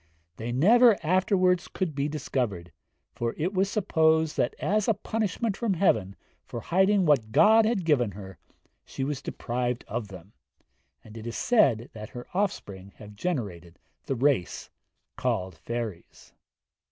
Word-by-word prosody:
They 115 Hz, +2 st, -4 dB
never 220 Hz, -, +5 dB
afterwards 185 Hz, +1 st, +2 dB
could 185 Hz, -5 st, -3 dB
be 140 Hz, +1 st, -1 dB
discovered, 120 Hz, -, -3 dB, 0.4 s
for 115 Hz, 0 st, -3 dB
it 175 Hz, +6 st, -1 dB
was 195 Hz, +1 st, +1 dB
supposed 160 Hz, -6 st, +2 dB
that 120 Hz, -, 0 dB
as 210 Hz, 0 st, 0 dB
a 225 Hz, -, +3 dB
punishment 215 Hz, +1 st, -2 dB
from 220 Hz, -4 st, -1 dB
heaven 110 Hz, -, +1 dB, 0.3 s
for 120 Hz, -, -7 dB
hiding 190 Hz, -, +2 dB
what 130 Hz, -8 st, +2 dB
God 220 Hz, -, +6 dB
had 215 Hz, -6 st, 0 dB
given 125 Hz, -, +2 dB
her, 95 Hz, -1 st, -10 dB, 0.4 s
she 135 Hz, -, -6 dB
was 140 Hz, -1 st, -3 dB
deprived 125 Hz, -2 st, -3 dB
of 110 Hz, 0 st, -4 dB
them; 95 Hz, +1 st, -13 dB, 0.7 s
and 110 Hz, 0 st, -14 dB
it 110 Hz, +1 st, -8 dB
is 115 Hz, -, -5 dB
said 135 Hz, -, +2 dB
these 110 Hz, -1 st, -8 dB
her 120 Hz, 0 st, -9 dB
offspring 100 Hz, -, -3 dB
have 105 Hz, -1 st, -12 dB
generated 100 Hz, -, -4 dB, 0.3 s
the 135 Hz, -, -1 dB
race 130 Hz, -, 0 dB, 0.5 s
called 95 Hz, 0 st, -1 dB
fairies.' 110 Hz, +2 st, -7 dB
135 Hz, 145 wpm, -27 LUFS, -, 0.7 s, God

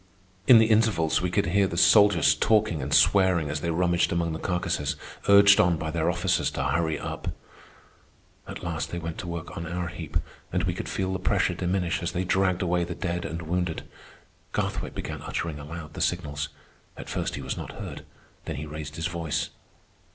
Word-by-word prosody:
In 125 Hz, -, +10 dB
the 110 Hz, -, +6 dB
intervals 110 Hz, -8 st, +2 dB
we 90 Hz, -, 0 dB
could 100 Hz, +3 st, +1 dB
hear 95 Hz, +3 st, +2 dB
the 85 Hz, -, -5 dB
soldiers 100 Hz, -6 st, +6 dB
talking 105 Hz, 0 st, +2 dB
and 65 Hz, +2 st, -4 dB
swearing 90 Hz, -6 st, +4 dB
as 75 Hz, 0 st, -3 dB
they 85 Hz, -, -1 dB
rummaged 85 Hz, +1 st, +2 dB
among 85 Hz, -1 st, 0 dB
the 80 Hz, -, -4 dB
carcasses, 90 Hz, -5 st, -1 dB, 0.3 s
urged 100 Hz, 0 st, +8 dB
on 90 Hz, -5 st, +4 dB
by 80 Hz, -1 st, -3 dB
their 80 Hz, 0 st, 0 dB
officers -, -, +1 dB
to 70 Hz, -, -3 dB
hurry 80 Hz, +3 st, 0 dB
up. -, -, -6 dB, 1.2 s
At -, -, -8 dB
last 85 Hz, -1 st, -3 dB
they 85 Hz, -, -4 dB
went 80 Hz, -1 st, -5 dB
to 90 Hz, -, -6 dB
work 85 Hz, +1 st, -6 dB
on 85 Hz, -3 st, -5 dB
our 90 Hz, 0 st, -3 dB
heap, 80 Hz, -4 st, -3 dB, 0.3 s
and -, -, 0 dB
we -, -, 0 dB
could -, -, -5 dB
feel 95 Hz, 0 st, -1 dB
the 95 Hz, -, -2 dB
pressure 95 Hz, -, +1 dB
diminish 90 Hz, -1 st, -1 dB
as 85 Hz, -, -3 dB
they 90 Hz, 0 st, -1 dB
dragged 95 Hz, 0 st, +1 dB
away 90 Hz, 0 st, +1 dB
the 85 Hz, 0 st, -5 dB
dead 90 Hz, -1 st, -3 dB
and 85 Hz, -2 st, -4 dB
wounded. 90 Hz, 0 st, -2 dB, 0.7 s
Garthwaite -, -, -2 dB
began -, -, -5 dB
uttering 80 Hz, -3 st, -4 dB
aloud 75 Hz, +1 st, -8 dB
the -, -, -6 dB
signals. 75 Hz, 0 st, -1 dB, 0.5 s
At -, -, -8 dB
first -, -, -2 dB
he -, -, -6 dB
was -, -, -3 dB
not -, -, -7 dB
heard. -, -, -7 dB, 0.4 s
Then -, -, -4 dB
he 70 Hz, +3 st, -5 dB
raised 75 Hz, 0 st, -7 dB
his 80 Hz, -, -3 dB
voice. 85 Hz, -3 st, -2 dB
85 Hz, 195 wpm, -26 LUFS, 80-95 Hz, 1.2 s, In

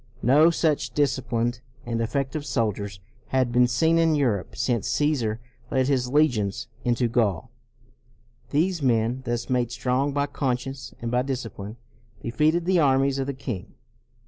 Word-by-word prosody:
No 150 Hz, +7 st, +6 dB
such 160 Hz, -3 st, 0 dB
disciplined 125 Hz, -4 st, 0 dB, 0.2 s
and 115 Hz, -1 st, -2 dB
effective 135 Hz, +5 st, -2 dB
soldiers 105 Hz, -6 st, -2 dB, 0.3 s
had 130 Hz, -2 st, +1 dB
been 125 Hz, +1 st, +4 dB
seen 160 Hz, +7 st, +2 dB
in 165 Hz, -1 st, +3 dB
Europe 120 Hz, -10 st, 0 dB
since 115 Hz, -1 st, 0 dB
Caesar 125 Hz, -8 st, 0 dB, 0.3 s
led 130 Hz, 0 st, +1 dB
his 125 Hz, -3 st, +1 dB
legions 125 Hz, -9 st, +1 dB, 0.2 s
into 120 Hz, 0 st, +1 dB
Gaul. 110 Hz, -8 st, 0 dB, 1.0 s
These 170 Hz, +3 st, +1 dB
men, 120 Hz, -1 st, +1 dB
thus 120 Hz, 0 st, -2 dB
made 125 Hz, -2 st, 0 dB
strong 130 Hz, +3 st, 0 dB
by 140 Hz, 0 st, 0 dB
con 130 Hz, -3 st, -1 dB
science 135 Hz, +1 st, -8 dB
and 115 Hz, -, -2 dB
by 125 Hz, 0 st, +2 dB
discipline, 120 Hz, -5 st, -5 dB, 0.4 s
defeated 155 Hz, +9 st, +1 dB
the 185 Hz, -1 st, +3 dB
armies 135 Hz, -2 st, +3 dB
of 135 Hz, -, -2 dB
the 140 Hz, -, -3 dB
king. 125 Hz, -6 st, -6 dB
130 Hz, 145 wpm, -25 LUFS, 115-145 Hz, 1.0 s, No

